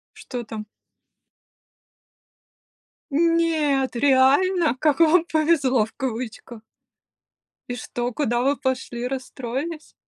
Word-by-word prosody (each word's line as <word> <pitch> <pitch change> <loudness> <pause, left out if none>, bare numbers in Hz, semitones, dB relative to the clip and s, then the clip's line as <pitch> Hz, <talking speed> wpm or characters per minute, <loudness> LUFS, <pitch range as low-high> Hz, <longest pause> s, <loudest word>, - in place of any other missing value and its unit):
Что 245 -2 -6
там? 215 -1 -7 2.5
Нет 315 -5 +2
реально? 285 +5 +3
Как 300 +1 +2
вам 330 +1 +5
повезло, 290 -7 +3
в 225 - -16
кавычках. 235 -2 -5 1.1
И 245 - -3
что, 245 0 -4
куда 240 -4 0
вы 280 +2 +1
пошли? 255 -2 -3
Расстроились? 270 +4 -5
270 Hz, 90 wpm, -23 LUFS, 245-315 Hz, 2.5 s, вам